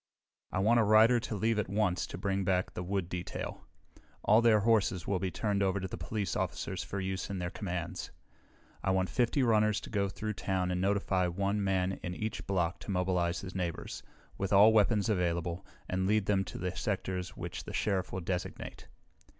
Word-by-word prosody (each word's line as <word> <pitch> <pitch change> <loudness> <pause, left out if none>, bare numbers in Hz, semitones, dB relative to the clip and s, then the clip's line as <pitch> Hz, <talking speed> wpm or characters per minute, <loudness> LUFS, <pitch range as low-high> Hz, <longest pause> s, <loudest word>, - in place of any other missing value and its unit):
"I - - -2
want 110 +5 +4
a - - +5
rider 110 +3 +6
to 115 - -4
leave 110 +2 +1
at 100 - -2
once 100 -3 +1
to - - -7
bring 100 -2 -1
back 90 0 0
the - - -4
wood 95 0 -1
detail. 90 -1 -5 0.6
All 110 +3 +5
their 110 -3 +5
horses 100 -5 +2
will 100 -2 0
be 95 0 -1
turned 100 +1 -1
over 95 0 +2
to 95 - -3
the - - -6
police 100 -6 -3
officers - - -2
for 100 - -4
use 95 0 -3
in 100 - -3
their 90 -1 -3
commands. 90 -2 -4 0.7
I - - 0
want 95 -1 +1
fifty 125 +2 +2
runners 110 -3 +3
to - - -9
go 100 -3 +1
through 105 +2 -4
town 95 -2 -1
and 90 0 -1
notify 95 -2 +1
one 100 +3 0
man 95 -1 0
in 90 0 -4
each 110 +2 -4
block 90 -3 0
to - - -11
mobilize 90 -2 0
his 95 -2 -7
neighbors, 90 -3 -4 0.4
with 95 - -1
all 105 +3 +7
weapons 105 -1 +3
available, 85 -4 0 0.2
and 95 +1 0
lead 105 -1 +2
them 95 -1 +2
to - - -7
the 90 0 -3
sectors 90 -1 -3
which - - -5
the - - -7
Sheriff 95 -3 0
will 95 - -3
designate. 90 +1 -4
95 Hz, 200 wpm, -31 LUFS, 90-105 Hz, 0.7 s, all